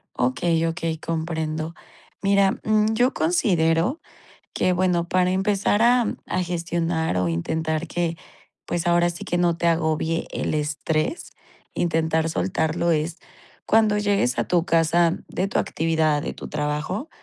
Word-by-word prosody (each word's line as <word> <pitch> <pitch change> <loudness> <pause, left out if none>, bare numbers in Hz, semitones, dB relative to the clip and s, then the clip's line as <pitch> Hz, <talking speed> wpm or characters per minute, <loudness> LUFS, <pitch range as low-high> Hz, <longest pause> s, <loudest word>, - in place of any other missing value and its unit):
Okey, 160 +7 +1
okey, 165 -1 -3
comprendo. 160 -1 -3 0.5
Mira, 195 -1 +3
mm, 215 0 +2
yo 245 +4 +2
considero 180 - +2 0.6
que 185 - +2
bueno 180 -1 +1
para 180 +1 +2
empezar 200 +2 +1
a 240 0 +4 0.2
a 185 - -1
gestionar 170 - -1
o 90 -1 +1
intentar 160 - -2
que, 170 0 -2 0.5
pues 175 -1 -2
ahora 175 0 +3
sí 170 - -8
que 175 - -1
no 175 -1 +2
te 170 - 0
agobie 165 0 0
el - - -2
estrés, 155 - -2 0.4
intentar 160 -1 0
soltarlo 170 -1 0
es 160 +1 -1 0.5
cuando 215 -1 +3
llegues 200 -12 +1
a - - +2
tu 175 -2 +1
casa 165 0 +2
de 185 - -1
tu - - -1
actividad, 160 -2 +1
de - - -4
tu - - -9
trabajo, 150 - -3
170 Hz, 140 wpm, -23 LUFS, 160-185 Hz, 0.6 s, a